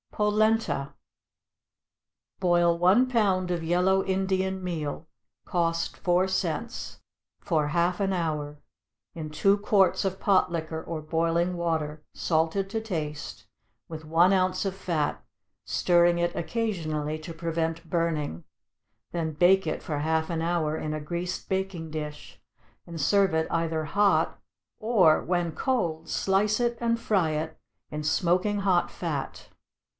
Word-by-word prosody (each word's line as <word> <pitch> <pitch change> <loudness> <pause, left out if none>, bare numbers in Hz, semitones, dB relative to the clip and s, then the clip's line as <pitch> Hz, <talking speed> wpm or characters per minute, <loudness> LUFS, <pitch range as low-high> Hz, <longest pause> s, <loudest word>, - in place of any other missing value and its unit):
=Polenta.= 210 -9 +1 1.5
Boil 175 -2 +3
one 190 +9 +4
pound 195 -7 +1
of 175 -2 -1
yellow 180 +3 +2
Indian 190 0 -1
meal, 160 -3 -4 0.4
(cost 165 -1 -1
four 180 +1 +2
cents,) 175 -5 -3 0.4
for 155 -3 0
half 170 +4 +1
an 195 -1 +1
hour, 150 -4 -2 0.6
in 155 -2 -5
two 195 +6 +3
quarts 200 -2 +3
of 190 0 -2
pot 190 -3 +3
liquor 160 -1 -4
or 165 -2 -5
boiling 165 +3 0
water, 160 -3 -2
salted 165 +4 0
to 220 +2 -2
taste, 155 -8 -5 0.4
with 160 -1 -8
one 170 +4 +4
ounce 185 +1 +1
of 195 -1 -2
fat, 165 -6 -2 0.4
stirring 175 0 +3
it 175 0 0
occasionally 160 -6 -2
to 165 +2 -8
prevent 165 0 -3
burning; 155 - -1 0.7
then 160 -2 -2
bake 180 +4 +4
it 155 - -2
for 150 -2 -3
half 160 +1 0
an 165 -2 -2
hour 165 -2 0
in 155 -1 -3
a 155 - -3
greased 175 +4 -4
baking 190 -4 -2
dish, 150 -1 -7 0.5
and 170 -1 -8
serve 195 +2 +3
it 160 0 +1
either 165 -1 -1
hot, 200 +6 +2 0.4
or, 210 -8 +4
when 175 -1 0
cold, 165 -10 -1
slice 205 +3 +1
it 240 -1 0
and 230 0 +1
fry 190 -8 +1
it 155 +1 -3 0.3
in 150 0 -5
smoking 180 +6 +1
hot 185 -3 +2
fat. 155 -6 -4
170 Hz, 135 wpm, -27 LUFS, 160-190 Hz, 1.5 s, one